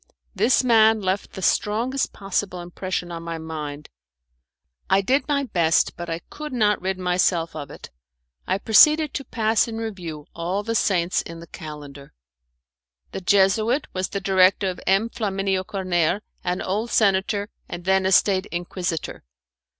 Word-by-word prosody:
This 255 +2 +3
man 225 -2 +5
left 190 0 -2
the 190 - -7
strongest 235 +9 0
possible 195 -2 -3
impression 175 0 -4
on 165 -1 -6
my 165 0 -5
mind. 150 -2 -6 1.0
I 195 - +4
did 265 +8 +1
my 285 -1 +1
best, 170 -10 +1
but 175 0 -7
I 165 +1 -3
could 300 0 -7
not 215 -4 +1
rid 190 0 -2
myself 180 -2 0
of 145 -2 -6
it. - - -11 0.6
I 190 - +1
proceeded 300 +9 +5
to 275 - -3
pass 225 -3 +1
in 225 -1 -5
review 180 -9 -6
all 180 +5 -2
the 230 +2 -2
saints 185 -5 +1
in 165 0 -9
the 170 - -10
calendar. 145 -4 -10 1.0
The - - -5
Jesuit 205 +8 +3
was 185 0 -2
the 200 - -3
director 190 0 +3
of 180 - -10
M. 195 +4 +3
Flaminio 195 -4 -1
Corner, 185 0 0 0.2
an 180 +1 -2
old 210 +5 -2
senator, 200 0 +1 0.2
and 175 0 -7
then 190 0 +3
a - - +1
State 190 +1 +3
Inquisitor. 175 -1 -4
190 Hz, 155 wpm, -23 LUFS, 175-215 Hz, 1.0 s, man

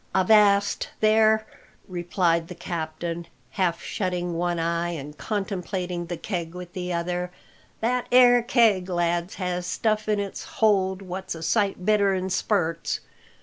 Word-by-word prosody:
"Avast 200 +1 +4
there!" 220 0 +4 0.4
replied 175 -2 0
the 180 - -8
captain, 170 0 -4 0.2
half 170 +4 0
shutting 180 -3 -2
one 175 +1 -1
eye 170 +1 0
and 150 -3 -6
contemplating 185 -3 -3
the 175 0 -4
keg 170 -3 -4
with 180 -1 -8
the 180 -1 -4
other, 175 +1 -2 0.5
"that 245 +2 0
'ere 245 -1 +7
keg, 225 -6 +3
lads, 175 0 0
has 180 -1 -3
stuff 215 +3 0
in 210 -1 +2
its 200 -1 -4
hold 195 -3 +2
what's 185 -1 -5
a 165 - -8
sight 200 -2 0
better'n 195 -3 +2
spurts. 180 -4 0
180 Hz, 135 wpm, -25 LUFS, 175-205 Hz, 0.5 s, ere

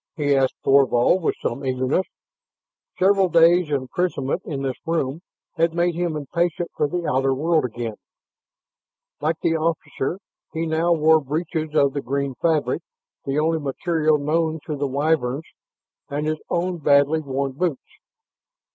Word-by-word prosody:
he 145 -4 +1
asked 135 -1 +2
Thorvald 135 +5 +4
with - - 0
some 135 +4 -2
eagerness. 130 +7 0 0.9
Several 195 0 +4
days' 170 0 +5
imprisonment 140 +2 -1
in 140 -4 -4
this 135 -1 -1
room 160 -2 -1 0.4
had 165 0 +1
made 175 0 +2
him 170 -1 -2
impatient 170 +4 -2
for 150 - +1
the 175 +2 -3
outer 135 -1 +1
world 160 +1 +1
again. 115 -1 -4 1.3
Like 155 +3 0
the 165 - +2
officer, 160 -1 -2 0.4
he 165 0 -2
now 165 +2 +1
wore 160 -1 +4
breeches 155 +2 -3
of 140 -2 +3
the 140 - -2
green 140 +1 -2
fabric, 160 -3 +1 0.4
the 135 +1 -1
only 160 +1 +1
material 155 +2 +1
known 160 +2 0
to 150 - -3
the 140 0 -1
Wyverns, 140 0 0 0.6
and 145 +1 -2
his 155 0 -1
own 175 0 -1
badly 145 +1 +4
worn 140 -2 -2
boots. 155 +1 -4
155 Hz, 145 wpm, -22 LUFS, 140-165 Hz, 1.3 s, days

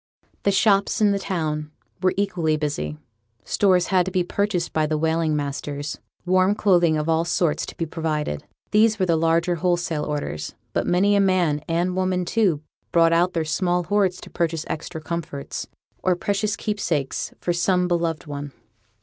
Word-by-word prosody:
The 200 - +2
shops 200 0 +3
in 210 -2 +4
the 200 - 0
town 155 -5 -2 0.3
were 185 - +2
equally 175 -6 +1
busy; 150 0 -3 0.5
stores 185 -3 +2
had 185 -1 +5
to - - -2
be 180 -1 +1
purchased 185 -1 -1
by 155 -1 +2
the 155 0 0
whaling 160 0 +1
masters, 145 0 -4 0.3
warm 185 +2 +3
clothing 175 -6 +3
of 150 +1 -2
all 165 0 +2
sorts 170 -2 0
to - - -9
be 165 - -1
provided. 155 - -2 0.3
These 215 +1 +4
were 190 - +1
the 170 -2 +2
larger 165 +2 +2
wholesale 175 -3 0
orders; 140 - -4 0.2
but - - 0
many 200 +3 +3
a - - +4
man, 180 -6 +2
and 175 +2 0
woman, 185 -1 0
too, 180 -8 +1 0.3
brought 165 -1 +4
out 175 +2 +3
their 165 -2 0
small 175 +2 0
hoards 190 0 +1
to - - -11
purchase 165 -2 -1
extra 160 +1 -5
comforts, 155 -4 -5 0.3
or 185 -1 +2
precious 205 +3 -1
keepsakes 170 -10 -2
for 175 - 0
some 180 +1 +2
beloved 170 -2 -1
one. 145 -1 -6
170 Hz, 170 wpm, -23 LUFS, 155-185 Hz, 0.5 s, had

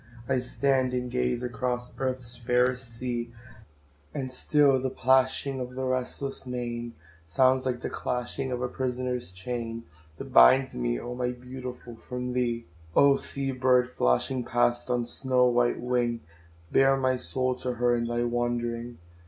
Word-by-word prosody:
I 130 -1 +2
stand 130 0 0
and 125 0 -3
gaze 125 -1 0
across 125 0 -3
Earth's 130 -2 -2
fairest 125 0 0
sea, 120 -1 -3 0.8
And 130 -2 -3
still 140 0 +3
the 130 - -1
plashing 130 +1 +2
of 125 0 -6
the 130 0 -2
restless 130 +1 -3
main, 120 -1 -4 0.3
Sounds 130 +8 +3
like 125 -1 -2
the - - -3
clashing 125 +2 -3
of 125 0 -2
a - - +1
prisoner's 125 -4 -3
chain, 115 +4 -5 0.3
That - - -8
binds 130 - +7
me, - - -1
oh! 120 - -6
my 125 0 -2
Beautiful, 125 -1 -8
from 125 +1 -5
thee. 120 -2 -1 0.3
Oh! 140 -1 +6
sea 135 0 -3
bird, 125 -1 +2
flashing 120 - +1
past 120 0 +1
on 120 -1 +1
snow 125 +1 +2
white 120 -1 +2
wing, 120 -1 0 0.5
Bear 135 0 +4
my 130 -1 +1
soul 130 +6 +3
to 125 0 -3
her 120 0 +2
in 115 0 -1
thy 120 0 0
wandering. 120 0 -2
125 Hz, 155 wpm, -27 LUFS, 120-130 Hz, 0.8 s, binds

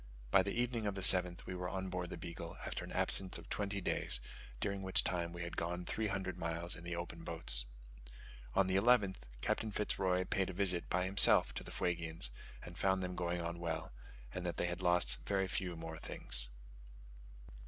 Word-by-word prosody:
By 95 - +6
the 100 +5 -2
evening 120 -3 -1
of 100 - -2
the 95 - -4
7th 90 -1 +7
we - - -5
were 90 0 -4
on 95 -1 -4
board 90 -1 -4
the - - -6
Beagle 85 -1 -7
after - - -4
an - - -9
absence 95 -1 0
of - - -13
twenty 100 -1 -2
days, - - +1 0.4
during 100 +4 -2
which 95 -1 +3
time 85 -2 -2
we 85 0 -6
had 85 - -6
gone 90 +1 -3
three 110 +3 -2
hundred 95 -2 -3
miles 85 0 0
in 85 - -10
the 85 0 -4
open 85 -1 -6
boats. 80 -8 +3 0.9
On 95 - +4
the 95 0 0
11th, 100 -3 +3 0.2
Captain 110 - -1
Fitz 105 +1 -2
Roy 95 -1 +2
paid 95 0 0
a - - -5
visit 90 -2 +1
by 90 +1 +1
himself 95 +2 +7
to - - -6
the - - -10
Fuegians 80 -6 -3 0.3
and 85 - -10
found 95 -1 +1
them 90 0 -4
going 85 0 -2
on 85 0 -4
well; 80 -2 -3 0.4
and 90 - -4
that 85 -1 -3
they - - 0
had 90 +1 -3
lost 90 -9 +3
very 95 -1 0
few 90 -2 -2
more 80 -1 -7
things. - - -1
90 Hz, 205 wpm, -35 LUFS, 85-95 Hz, 0.9 s, 7th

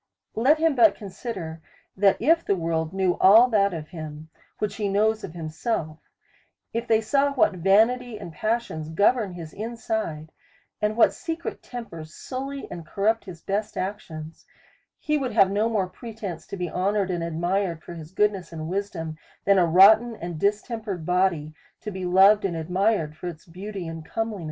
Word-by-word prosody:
Let 265 +8 +4
him 320 0 +2
but 225 -6 +5
consider, 185 -5 -6 0.3
that 195 0 +3
if 330 +7 +3
the 200 - +1
world 165 -2 -1
knew 190 -2 +1
all 220 +6 +8
that 200 -3 +3
of 155 -3 -6
him, 155 -2 -8 0.3
which 205 -1 -3
he 210 -2 -1
knows 215 +2 +1
of 175 - -7
himself; 160 0 -3 0.7
if 235 +1 -2
they 220 -1 +4
saw 280 +5 +2
what 260 - +3
vanity 220 +6 +2
and 170 - -8
passions 215 -5 -2
govern 200 +4 +2
his 165 -3 -8
inside, 215 -8 -4 0.5
and 210 +1 0
what 235 - +5
secret 330 0 -5
tempers 165 -11 -8
sully 275 +2 -5
and 170 - -6
corrupt 210 +7 0
his 175 -4 -10
best 205 +2 -2
actions, 165 -5 -6 0.5
he 300 -1 0
would 255 -4 -3
have 195 -3 +5
no 210 +3 +1
more 210 -4 +1
pretence 200 -2 -8
to 200 - -6
be 180 -1 -2
honoured 190 +3 0
and 175 -2 -2
ad 165 -1 -4
mired 175 -1 -1
for - - -9
his 160 -1 -10
goodness 195 -4 0
and 160 -1 -6
wisdom, 175 -5 -4 0.3
than 200 -1 +5
a 175 - +4
rotten 215 +7 +6
and 170 -5 -6
distempered 210 - -2
body 180 -4 +1 0.3
to 210 - -6
be 190 -1 -5
loved 195 +4 +6
and 190 -4 -1
admired 180 -1 0
for 180 - -7
its 160 -3 -8
beauty 185 +1 -7
and 165 -1 -6
comeliness. 225 +4 -3
195 Hz, 175 wpm, -25 LUFS, 165-220 Hz, 0.7 s, all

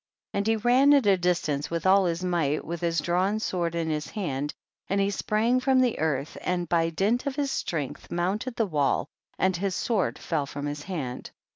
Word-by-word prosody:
29. - - 0
And 200 - -3
he 225 +1 +1
ran 270 +4 +6
at 275 -5 +3
a 200 -1 +6
distance 175 -5 0
with 170 +1 -3
all 190 0 +5
his 170 0 -1
might, 165 -5 0
with 170 0 -5
his 165 -2 +1
drawn 185 +7 +1
sword 175 -5 -1
in 165 -1 -1
his 155 -1 -2
hand, 145 -8 -3 0.4
and 195 +2 0
he 200 0 +2
sprang 225 +5 +1
from 260 0 +3
the 250 -3 +2
earth 150 -2 -1
and 180 -1 -1
by 165 0 +2
dint 210 - 0
of 275 - -2
his 280 -1 -1
strength, 150 -6 -3
mounted 200 +8 -1
the 225 - +1
wall, 150 -7 0 0.3
and 190 -1 +2
his 190 0 -1
sword 220 -5 0
fell 150 -4 -2
from 145 +1 -5
his 145 0 -4
hand. 145 -8 -5
180 Hz, 210 wpm, -27 LUFS, 160-215 Hz, 0.4 s, ran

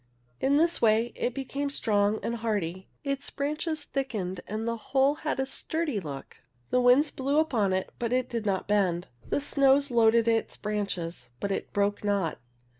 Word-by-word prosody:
In 280 +2 +3
this 335 +2 +2
way 225 +1 +3
it 245 - -2
became 275 +1 -3
strong 210 -5 +1
and 235 - -2
hardy, 195 -5 -2 0.2
its 275 0 -2
branches 305 +2 -2
thickened 215 -11 -3
and 220 +2 -3
the 230 - 0
whole 270 +4 +2
had 305 -3 -1
a 265 - +1
sturdy 300 -2 -2
look. 140 -6 -8 0.3
The 250 - +3
winds 250 +5 +5
blew 275 +2 -1
upon 240 -11 +2
it, 185 0 -1
but 235 -1 -1
it 255 0 +1
did 230 -2 -3
not 195 -3 -1
bend. 185 -4 +1 0.2
The - - +1
snows 275 -1 +3
loaded 230 -1 +4
its 225 -1 +1
branches, 185 - -3
but 200 - -2
it - - -3
hrcke 205 0 0
not. 200 -5 0
230 Hz, 175 wpm, -28 LUFS, 205-275 Hz, 0.3 s, winds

